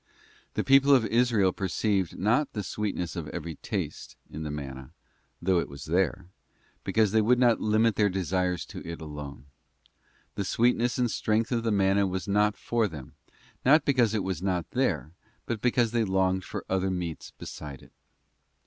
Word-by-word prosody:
The -, -, 0 dB
people 135 Hz, +1 st, +6 dB
of 120 Hz, -4 st, +3 dB
Israel 115 Hz, -5 st, +2 dB
perceived 95 Hz, -1 st, -1 dB
not 120 Hz, +9 st, +1 dB
the 105 Hz, -, -3 dB
sweetness 95 Hz, -4 st, -3 dB
of 85 Hz, -4 st, -4 dB
every 80 Hz, -2 st, -6 dB
taste -, -, -5 dB, 0.2 s
in 75 Hz, -, -6 dB
the 75 Hz, -, -4 dB
manna, 65 Hz, -3 st, -7 dB, 0.5 s
though 90 Hz, 0 st, +2 dB
it -, -, -3 dB
was 70 Hz, 0 st, -9 dB
there, 90 Hz, +2 st, 0 dB, 0.6 s
because 110 Hz, -3 st, +2 dB
they 110 Hz, +1 st, +4 dB
would 120 Hz, +4 st, +4 dB
not 120 Hz, -2 st, +3 dB
limit 110 Hz, +1 st, +2 dB
their 105 Hz, -1 st, +4 dB
desires 90 Hz, -1 st, -1 dB
to -, -, -9 dB
it 85 Hz, 0 st, -6 dB
alone. 75 Hz, -3 st, -8 dB, 0.9 s
The 100 Hz, -, -2 dB
sweetness 120 Hz, +4 st, +1 dB
and 120 Hz, -2 st, +1 dB
strength 110 Hz, +2 st, 0 dB
of 120 Hz, -2 st, +1 dB
the 115 Hz, -, -1 dB
manna 100 Hz, 0 st, +3 dB
was 95 Hz, -1 st, -4 dB
not 105 Hz, +1 st, +2 dB
for 115 Hz, -2 st, 0 dB
them, 75 Hz, -8 st, -10 dB, 0.5 s
not 145 Hz, +3 st, +5 dB
because 120 Hz, -6 st, +3 dB
it 105 Hz, -, 0 dB
was 95 Hz, -2 st, -3 dB
not 90 Hz, -3 st, -1 dB
there, 80 Hz, -, 0 dB, 0.3 s
but 115 Hz, -3 st, -3 dB
because 120 Hz, -2 st, +2 dB
they 115 Hz, -1 st, +2 dB
longed 95 Hz, -1 st, +1 dB
for -, -, -6 dB
other 95 Hz, 0 st, 0 dB
meats 90 Hz, -4 st, -4 dB
beside 70 Hz, -3 st, -8 dB
it. -, -, -18 dB
95 Hz, 175 wpm, -28 LUFS, 85-115 Hz, 0.9 s, people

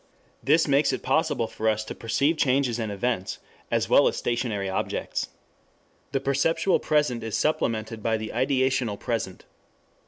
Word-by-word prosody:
This 155 Hz, +4 st, +3 dB
makes 140 Hz, +1 st, +3 dB
it -, -, -4 dB
possible 130 Hz, -4 st, +1 dB
for 110 Hz, 0 st, -1 dB
us 110 Hz, 0 st, -1 dB
to -, -, -6 dB
perceive 140 Hz, +8 st, +1 dB
changes 130 Hz, -4 st, +2 dB
and 110 Hz, -2 st, -2 dB
events 100 Hz, -2 st, -2 dB, 0.3 s
as -, -, +1 dB
well -, -, +5 dB
as -, -, -1 dB
stationary 115 Hz, -5 st, -1 dB
objects. 95 Hz, -, -2 dB, 0.8 s
The 135 Hz, -, +1 dB
perceptual 160 Hz, +7 st, +2 dB
present 150 Hz, -6 st, +1 dB
is 110 Hz, -1 st, -2 dB
supplemented 115 Hz, -7 st, -1 dB
by 110 Hz, +1 st, +1 dB
the 110 Hz, 0 st, -5 dB
ideational 130 Hz, -4 st, +1 dB
present. 115 Hz, -6 st, -3 dB
120 Hz, 150 wpm, -26 LUFS, 110-140 Hz, 0.8 s, well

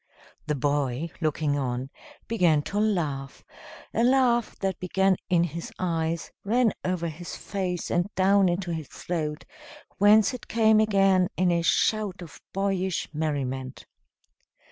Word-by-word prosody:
The 150 Hz, -, 0 dB
boy, 145 Hz, +2 st, -1 dB
looking 150 Hz, -2 st, 0 dB
on, 130 Hz, 0 st, -3 dB, 0.4 s
began 175 Hz, -10 st, +2 dB
to 205 Hz, -, -3 dB
laugh, 155 Hz, -11 st, -1 dB, 0.5 s
a 230 Hz, -, +1 dB
laugh 245 Hz, -2 st, +2 dB
that 190 Hz, -2 st, -2 dB
began 190 Hz, +1 st, +2 dB
in 175 Hz, -2 st, +3 dB
his 170 Hz, 0 st, -5 dB
eyes, 165 Hz, -2 st, -2 dB
ran 230 Hz, +1 st, +2 dB
over 180 Hz, -2 st, -1 dB
his 165 Hz, +2 st, -7 dB
face 185 Hz, -3 st, -3 dB
and 175 Hz, +2 st, +1 dB
down 195 Hz, 0 st, +4 dB
into 175 Hz, 0 st, -2 dB
his 160 Hz, -4 st, -5 dB
throat, 155 Hz, -1 st, -4 dB, 0.5 s
whence 205 Hz, +2 st, +5 dB
it 250 Hz, -, -8 dB
came 220 Hz, -1 st, +4 dB
again 195 Hz, -4 st, +3 dB
in 180 Hz, -1 st, +3 dB
a 170 Hz, 0 st, +2 dB
shout 200 Hz, +2 st, +1 dB
of 160 Hz, -, -13 dB
boyish 190 Hz, -3 st, -1 dB
merriment. 135 Hz, -4 st, -3 dB
175 Hz, 135 wpm, -26 LUFS, 155-200 Hz, 0.5 s, whence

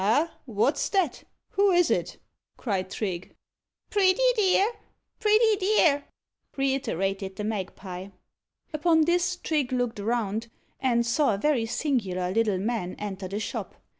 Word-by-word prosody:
"Ah! 285 Hz, +12 st, +2 dB
what's 250 Hz, +5 st, +1 dB
that? 375 Hz, -8 st, 0 dB, 0.3 s
Who 400 Hz, +1 st, +3 dB
is 355 Hz, -2 st, +4 dB
it?" -, -, -1 dB, 0.4 s
cried 190 Hz, -5 st, -2 dB
Trigge. 190 Hz, -4 st, -4 dB, 0.6 s
"Pretty 385 Hz, 0 st, +3 dB, 0.2 s
dear! 405 Hz, 0 st, +3 dB, 0.5 s
pretty 430 Hz, 0 st, +4 dB
dear!" 360 Hz, -8 st, +3 dB, 0.5 s
reiterated 195 Hz, -8 st, -1 dB
the 210 Hz, -, -5 dB
magpie. 190 Hz, -3 st, -5 dB, 0.7 s
Upon 320 Hz, +1 st, +3 dB
this, 350 Hz, +2 st, +1 dB
Trigge 300 Hz, -7 st, -1 dB
looked 245 Hz, -3 st, -1 dB
around, 225 Hz, 0 st, -1 dB, 0.3 s
and 235 Hz, -3 st, +2 dB
saw 235 Hz, -1 st, +2 dB
a -, -, -4 dB
very 245 Hz, -1 st, +1 dB
singular 200 Hz, -10 st, -1 dB
little 215 Hz, -2 st, +2 dB
man 200 Hz, -2 st, -2 dB
enter 195 Hz, -2 st, -5 dB
the 200 Hz, +3 st, -4 dB
shop. -, -, -5 dB
240 Hz, 130 wpm, -27 LUFS, 200-330 Hz, 0.7 s, is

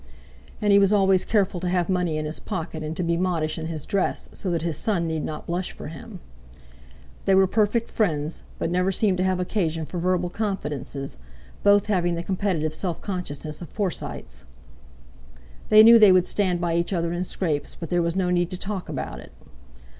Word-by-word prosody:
And 205 Hz, -1 st, +4 dB
he 200 Hz, -, +7 dB
was 195 Hz, 0 st, +4 dB
always 195 Hz, -2 st, +4 dB
careful 200 Hz, -4 st, +1 dB
to 180 Hz, 0 st, -2 dB
have 175 Hz, -2 st, +1 dB
money 180 Hz, -4 st, 0 dB
in 155 Hz, -, -2 dB
his 155 Hz, +1 st, -4 dB
pocket, 165 Hz, -5 st, -5 dB
and 155 Hz, +1 st, -5 dB
to 180 Hz, -, -1 dB
be 170 Hz, 0 st, +1 dB
modish 165 Hz, -4 st, -1 dB
in 160 Hz, -, -4 dB
his 160 Hz, -3 st, -5 dB
dress, 200 Hz, -3 st, -1 dB
so 190 Hz, -, -4 dB
that 170 Hz, -2 st, -1 dB
his 165 Hz, -2 st, -1 dB
son 180 Hz, -1 st, 0 dB
need 160 Hz, -1 st, -2 dB
not 155 Hz, -, -5 dB
blush 175 Hz, +2 st, -3 dB
for -, -, -8 dB
him. 195 Hz, +2 st, -10 dB, 1.0 s
They 195 Hz, -, +4 dB
were 190 Hz, 0 st, +6 dB
perfect 215 Hz, +4 st, +1 dB
friends, 155 Hz, -7 st, -1 dB, 0.2 s
but 165 Hz, -, -2 dB
never 180 Hz, +2 st, +1 dB
seemed 190 Hz, -1 st, +1 dB
to -, -, +2 dB
have 185 Hz, -1 st, +1 dB
occasion 165 Hz, -4 st, -1 dB
for 170 Hz, +4 st, -5 dB
verbal 180 Hz, 0 st, 0 dB
confidences, 150 Hz, -, -4 dB, 0.4 s
both 205 Hz, -1 st, +5 dB
having 175 Hz, -4 st, +1 dB
the 170 Hz, -, -4 dB
competitive 180 Hz, -5 st, -1 dB
self 170 Hz, +1 st, -3 dB
consciousness 155 Hz, -5 st, -5 dB
of 175 Hz, -, -8 dB
Forsytes. 150 Hz, -, -4 dB, 1.3 s
They 215 Hz, 0 st, +9 dB
knew 230 Hz, +1 st, +9 dB
they 210 Hz, -3 st, +8 dB
would 185 Hz, -1 st, +5 dB
stand 185 Hz, -4 st, +1 dB
by 170 Hz, -1 st, -1 dB
each 170 Hz, +3 st, -1 dB
other 170 Hz, -1 st, -1 dB
in 175 Hz, +1 st, -1 dB
scrapes, 160 Hz, -5 st, -2 dB
but 165 Hz, -, -7 dB
there 175 Hz, 0 st, +2 dB
was 170 Hz, 0 st, -1 dB
no 185 Hz, -2 st, +1 dB
need 175 Hz, -1 st, +1 dB
to 185 Hz, -, -4 dB
talk 195 Hz, 0 st, -5 dB
about -, -, -5 dB
it. -, -, -13 dB
180 Hz, 200 wpm, -24 LUFS, 165-195 Hz, 1.3 s, They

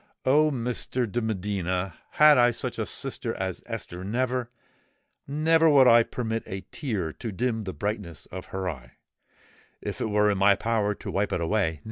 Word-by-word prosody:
Oh! 150 Hz, +4 st, +5 dB
Mr. 125 Hz, -1 st, -2 dB
de 120 Hz, +2 st, -2 dB
Medina, 95 Hz, -4 st, -2 dB, 0.2 s
had 150 Hz, 0 st, +7 dB
I 120 Hz, -2 st, +5 dB
such 120 Hz, -, -4 dB
a -, -, -1 dB
sister -, -, -3 dB
as -, -, -3 dB
Esther, 90 Hz, +1 st, -6 dB
never—never, 130 Hz, +7 st, -1 dB
would 135 Hz, -3 st, +6 dB
I 120 Hz, -1 st, +8 dB
permit 115 Hz, -1 st, -3 dB
a 95 Hz, 0 st, -5 dB
tear 100 Hz, -, -3 dB
to 115 Hz, -, -6 dB
dim 110 Hz, +1 st, -1 dB
the 95 Hz, -, -4 dB
brightness 100 Hz, -6 st, -4 dB
of 95 Hz, 0 st, -8 dB
her 95 Hz, -1 st, -4 dB
eye, 65 Hz, -8 st, -6 dB, 0.9 s
if -, -, -5 dB
it -, -, -1 dB
were 105 Hz, 0 st, +3 dB
in 100 Hz, -, -1 dB
my 100 Hz, +1 st, +6 dB
power 105 Hz, -2 st, 0 dB
to -, -, -7 dB
wipe 100 Hz, +1 st, 0 dB
it -, -, 0 dB
away! 85 Hz, -2 st, 0 dB
110 Hz, 170 wpm, -26 LUFS, 95-125 Hz, 0.9 s, I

